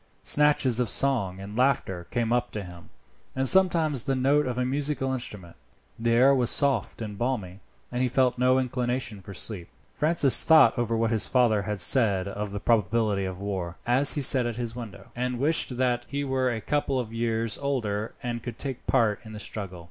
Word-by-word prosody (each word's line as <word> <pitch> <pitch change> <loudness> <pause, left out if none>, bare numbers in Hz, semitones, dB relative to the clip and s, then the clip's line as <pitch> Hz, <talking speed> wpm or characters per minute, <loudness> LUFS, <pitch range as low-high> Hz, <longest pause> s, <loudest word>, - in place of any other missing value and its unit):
Snatches 145 -5 +2
of 120 -3 0
song 110 -10 0
and 100 +2 -9
laughter 115 -9 0
came 115 -1 -1
up 120 0 0
to 105 - -6
him, 90 -2 -13 0.5
and 135 0 0
sometimes 165 -8 +3
the 135 -1 0
note 140 +2 +2
of 125 -1 -4
a 125 - 0
musical 135 0 -1
instrument. 105 -9 -6 0.4
The 115 +1 -1
air 130 +3 +5
was 125 -3 +2
soft 135 -5 +2
and 105 -2 -8
balmy, 105 -7 -3 0.3
and 125 0 -2
he 130 - +2
felt 125 0 +1
no 130 +1 +3
inclination 125 -4 -2
for 100 +1 -10
sleep. 90 -3 -6 0.3
Francis 150 -3 +4
thought 155 -8 +6
over 115 -1 -1
what 115 0 0
his 110 -2 +1
father 120 -5 +2
had 105 +1 -4
said 100 -1 +2
of 105 +1 -5
the 100 - -4
probability 105 -2 0
of 95 -1 -6
war, 95 -3 -5
as 130 +4 +5
he 145 - -1
sat 130 -2 +5
at 120 - -4
his 120 -1 -5
window, 105 -5 -10
and 125 0 -3
wished 140 -2 +1
that 125 -1 -1
he 140 0 -3
were 130 -2 0
a 110 -2 -4
couple 140 -1 -1
of 115 -2 -6
years 115 -1 -2
older 110 -7 -3
and 120 -1 -4
could 120 +1 -7
take 135 -3 -5
part 105 -3 +2
in 110 -1 -11
the 105 - -8
struggle. 95 -5 -6
120 Hz, 200 wpm, -26 LUFS, 105-130 Hz, 0.5 s, thought